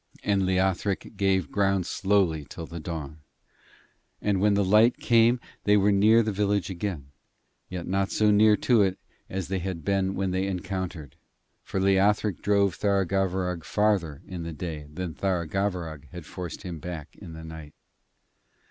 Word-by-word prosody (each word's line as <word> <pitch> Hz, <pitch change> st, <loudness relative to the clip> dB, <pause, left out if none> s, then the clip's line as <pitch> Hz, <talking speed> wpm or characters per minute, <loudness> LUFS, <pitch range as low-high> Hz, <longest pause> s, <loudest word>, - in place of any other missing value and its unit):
And 100 Hz, -2 st, +1 dB
Leothric 95 Hz, +1 st, 0 dB
gave 95 Hz, -6 st, +1 dB
ground 95 Hz, -2 st, +1 dB
slowly 95 Hz, -7 st, +1 dB
till 85 Hz, -, -7 dB
the 85 Hz, +1 st, -8 dB
dawn, 80 Hz, -2 st, -6 dB, 1.0 s
and 100 Hz, -2 st, 0 dB
when 105 Hz, 0 st, +4 dB
the 100 Hz, -1 st, +2 dB
light 110 Hz, +5 st, +5 dB
came 120 Hz, +1 st, +4 dB, 0.3 s
they 105 Hz, 0 st, +5 dB
were 100 Hz, +1 st, +4 dB
near 110 Hz, +4 st, +5 dB
the 110 Hz, -, -1 dB
village 100 Hz, -2 st, 0 dB
again; 85 Hz, -7 st, -5 dB, 0.6 s
yet 90 Hz, -2 st, -5 dB
not 95 Hz, +1 st, 0 dB
so 105 Hz, -1 st, +3 dB
near 105 Hz, 0 st, +5 dB
to 115 Hz, +1 st, +3 dB
it 95 Hz, -2 st, +1 dB, 0.3 s
as 95 Hz, -2 st, -3 dB
they 95 Hz, 0 st, -1 dB
had 90 Hz, -4 st, -5 dB
been 95 Hz, -1 st, +1 dB
when 95 Hz, -1 st, -1 dB
they 95 Hz, +1 st, 0 dB
encountered, 90 Hz, -5 st, -5 dB, 0.4 s
for 95 Hz, -, -4 dB
Leothric 100 Hz, +1 st, +2 dB
drove 100 Hz, -2 st, +2 dB
Tharagavverug 95 Hz, -3 st, 0 dB
farther 100 Hz, -9 st, 0 dB
in 90 Hz, -2 st, -6 dB
the 85 Hz, 0 st, -5 dB
day 80 Hz, -3 st, -6 dB
than 85 Hz, +1 st, -5 dB
Tharagavverug 85 Hz, -3 st, -2 dB
had 90 Hz, -2 st, -9 dB
forced 90 Hz, +4 st, -7 dB
him 90 Hz, -4 st, -6 dB
back 80 Hz, -2 st, -7 dB
in 85 Hz, -5 st, -10 dB
the 80 Hz, 0 st, -9 dB
night. 80 Hz, -2 st, -10 dB
95 Hz, 155 wpm, -26 LUFS, 85-100 Hz, 1.0 s, light